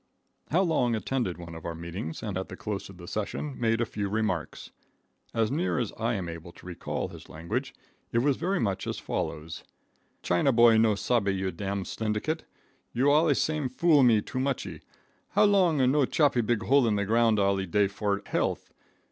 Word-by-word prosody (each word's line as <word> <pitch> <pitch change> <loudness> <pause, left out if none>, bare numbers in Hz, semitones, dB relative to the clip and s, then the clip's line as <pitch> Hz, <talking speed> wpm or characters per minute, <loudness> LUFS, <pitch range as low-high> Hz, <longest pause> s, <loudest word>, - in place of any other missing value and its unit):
How 180 +5 +3
Long 125 -9 +1
attended 110 -5 -2
one 85 -1 -9
of 80 -1 -9
our 85 -1 -4
meetings 85 0 -6
and 105 -4 -3
at 95 0 -4
the - - -7
close 105 -3 -4
of 95 - -12
the 85 -1 -11
session 110 +9 -3
made 115 -1 +1
a 120 - +2
few 105 -2 -4
remarks. 105 -6 -2 0.6
As 115 -1 0
near 170 +6 0
as 120 -5 -2
I 115 +1 -1
am 95 -3 -3
able 85 +1 -8
to - - -16
recall 90 -2 -4
his - - -12
language, 80 +2 -4 0.4
it - - 0
was 135 +3 +3
very 185 +6 -1
much 100 -5 -1
as - - -3
follows: 80 +1 -4 0.6
"China 90 +10 +2
boy 115 -2 +6
no 110 -2 +4
sabbe 105 +1 0
you 95 -1 -1
dam 100 +3 -3
slyndicate. 110 - -2 0.5
You 135 +4 +3
allee 150 0 +4
same 155 -3 0
foolee 150 +2 +4
me 110 -3 +4
too 130 - -4
muchee. 135 0 -2 0.5
How 205 - +6
Long 190 -6 +4
no 145 -1 +3
chopee 145 -5 +3
big 115 0 0
hole 135 -1 +4
in 110 - +2
the 100 0 0
glound 115 +1 +3
allee 100 -1 +1
day 100 +3 +2
for 100 0 -2
health. - - -2
110 Hz, 190 wpm, -28 LUFS, 95-135 Hz, 0.6 s, boy